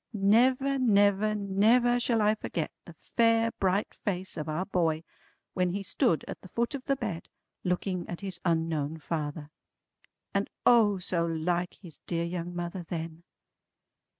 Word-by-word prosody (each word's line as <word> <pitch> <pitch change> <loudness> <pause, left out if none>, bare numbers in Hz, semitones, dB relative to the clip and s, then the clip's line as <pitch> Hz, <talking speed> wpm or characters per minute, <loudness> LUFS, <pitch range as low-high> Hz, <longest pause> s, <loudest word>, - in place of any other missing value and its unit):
Never 255 +7 +3
never 205 -2 +3
never 220 +5 +3
shall 235 -3 +2
I 210 +1 +4
forget 170 -7 -3
the 170 - -11
fair 230 +6 +2
bright 195 +2 +1
face 190 -2 -3
of 155 -1 -4
our 165 +5 -1
boy 165 -4 0 0.5
when 180 -1 +1
he 200 +1 -3
stood 165 -4 +1
at - - -7
the - - -11
foot 235 +8 -1
of 270 -2 -5
the 275 - +2
bed, 215 -10 -5 0.3
looking 180 0 -1
at 175 - -5
his 190 -3 -4
unknown 160 -3 0
father. 150 -1 -4 0.8
And 200 0 0 0.2
O 220 -5 +5
so 180 -2 0
like 175 +2 -1
his 170 -6 -10
dear 170 -1 -1
young 175 0 -4
mother 175 +1 -4
then! 165 -1 -6
185 Hz, 150 wpm, -29 LUFS, 170-215 Hz, 0.8 s, O